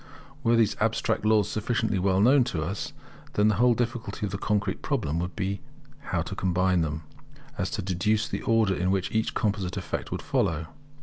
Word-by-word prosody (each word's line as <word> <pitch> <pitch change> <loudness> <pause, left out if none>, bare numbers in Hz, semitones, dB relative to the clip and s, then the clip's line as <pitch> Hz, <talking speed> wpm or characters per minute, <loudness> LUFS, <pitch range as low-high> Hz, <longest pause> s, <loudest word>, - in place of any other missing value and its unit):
Were 120 -1 +4
these 115 -3 +3
abstract 110 -1 +1
laws 110 -2 +4
sufficiently 110 -2 0
well 95 0 +2
known 130 +4 +6
to 80 -8 -2
us, 95 +6 -4 0.4
then 105 +1 +4
the 110 - +2
whole 120 +1 +5
difficulty 115 -3 -2
of 100 - -4
the 100 - -3
concrete 100 -3 0
problem 100 - -1
would 90 0 -4
be 100 0 -2 0.5
so - - +1
to - - -6
combine 90 -1 +2
them, 80 0 -2 0.5
as - - -1
to - - -3
deduce 105 +4 +1
the - - -3
order 115 -4 +3
in 90 0 0
which 95 -1 0
each 110 0 0
composite 100 -5 -1
effect - - -4
would - - -3
follow. 80 0 0
100 Hz, 190 wpm, -27 LUFS, 90-110 Hz, 0.5 s, known